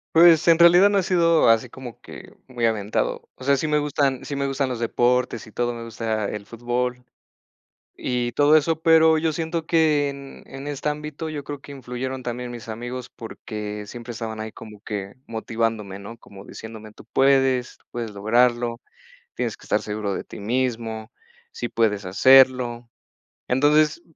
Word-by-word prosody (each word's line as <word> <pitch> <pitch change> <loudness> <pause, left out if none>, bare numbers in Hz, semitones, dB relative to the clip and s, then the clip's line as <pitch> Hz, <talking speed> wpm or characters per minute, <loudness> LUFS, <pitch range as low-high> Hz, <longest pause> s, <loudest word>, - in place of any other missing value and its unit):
Pues, 165 0 +7
en 165 -1 +7
realidad, 175 +3 +7
no 205 - +1
he - - 0
sido 170 -7 +3
así 115 +2 +3
como 125 -2 -10
que - - -12
muy 120 -2 -2
aventado, 110 -2 -1
o 130 - -12
sea, 140 0 +3
sí 155 - -2
me 150 0 +2
gustan 140 -3 0
sí 140 - -4
me 140 0 -1
gustan 135 -1 -1
los 125 - -4
deportes 120 0 +1
y 110 - -14
todo, 120 +2 -1
me 115 0 -7
gusta 110 -2 -3
el 105 -1 -6
fútbol 125 +2 -3 0.9
y 120 -1 -2
todo 145 +2 +5
eso, 160 +1 0
pero 160 -1 +5
yo 160 0 +1
siento 165 0 -3
que 155 -3 +3
en 140 0 -10
en 135 +1 -8
este 145 0 -2
ámbito 150 +1 -5
yo 150 -2 -5
creo 145 -1 -7
que 145 - -12
influyeron 130 0 -5
también 125 0 -4
mis 120 -2 -9
amigos 120 +3 -6
porque 105 -2 -7
siempre 120 +2 -8
estaban 110 -1 -6
ahí 110 0 -5
como 105 -2 -12
que 100 -3 -5
motivándome, 110 -3 -3
¿no?, 115 +4 -10
como 100 -3 -14
diciéndome: 110 0 -10
"Tú - - -16
puedes, 135 -2 +3
puedes 115 -3 -4
lograrlo, 120 +3 +1 0.5
tienes - - -3
que - - -18
estar - - +1
seguro 105 -1 -3
de - - -4
ti - - -11
mismo, 115 -1 -2 0.4
sí 470 +1 -5
puedes 105 -3 0
hacerlo". 125 +3 +4 0.6
Entonces, 150 +5 +3
125 Hz, 175 wpm, -23 LUFS, 115-145 Hz, 0.9 s, Pues